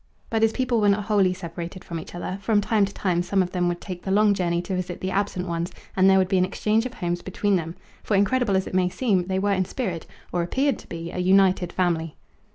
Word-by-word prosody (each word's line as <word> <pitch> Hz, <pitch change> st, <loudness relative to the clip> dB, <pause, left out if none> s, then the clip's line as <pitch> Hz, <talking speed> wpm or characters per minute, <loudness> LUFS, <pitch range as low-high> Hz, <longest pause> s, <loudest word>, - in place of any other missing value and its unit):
But 225 Hz, -1 st, +1 dB
his 225 Hz, 0 st, +4 dB
people 250 Hz, -2 st, 0 dB
were 205 Hz, -, +4 dB
not 200 Hz, +1 st, +2 dB
wholly 200 Hz, -3 st, +3 dB
separated 175 Hz, 0 st, -7 dB
from 165 Hz, -1 st, -5 dB
each 160 Hz, -, -10 dB
other; 185 Hz, +2 st, -4 dB
from 210 Hz, +1 st, +2 dB
time 205 Hz, 0 st, +2 dB
to 200 Hz, -, -8 dB
time 175 Hz, -3 st, 0 dB
some 190 Hz, +2 st, +1 dB
of 180 Hz, -, -6 dB
them 180 Hz, -1 st, 0 dB
would 175 Hz, 0 st, -1 dB
take 180 Hz, -2 st, -7 dB
the -, -, -6 dB
long 205 Hz, +1 st, +4 dB
journey 175 Hz, -3 st, 0 dB
to 190 Hz, -, -3 dB
visit 180 Hz, -1 st, -4 dB
the 185 Hz, -, -3 dB
absent 190 Hz, -2 st, -1 dB
ones 170 Hz, 0 st, -2 dB, 0.2 s
and 190 Hz, 0 st, +5 dB
there 190 Hz, -, +6 dB
would 190 Hz, -1 st, +3 dB
be 190 Hz, 0 st, +2 dB
an -, -, +4 dB
exchange 220 Hz, +5 st, 0 dB
of 250 Hz, -, -13 dB
homes 175 Hz, -1 st, -2 dB
between 200 Hz, +2 st, 0 dB
them. 165 Hz, -1 st, -3 dB, 0.3 s
For, 210 Hz, -, 0 dB
incredible 205 Hz, +1 st, +2 dB
as 190 Hz, -, -1 dB
it -, -, -8 dB
may 185 Hz, -1 st, +2 dB
seem, 190 Hz, -5 st, 0 dB
they 190 Hz, 0 st, -1 dB
were 200 Hz, +1 st, +1 dB
in 185 Hz, -1 st, +1 dB
spirit, 180 Hz, -7 st, -4 dB, 0.2 s
or 175 Hz, -, 0 dB
appeared 265 Hz, +9 st, 0 dB
to -, -, -14 dB
be, 165 Hz, 0 st, -6 dB
a -, -, -5 dB
united 185 Hz, -1 st, +3 dB
family. 165 Hz, -3 st, -1 dB
190 Hz, 260 wpm, -24 LUFS, 175-205 Hz, 0.3 s, there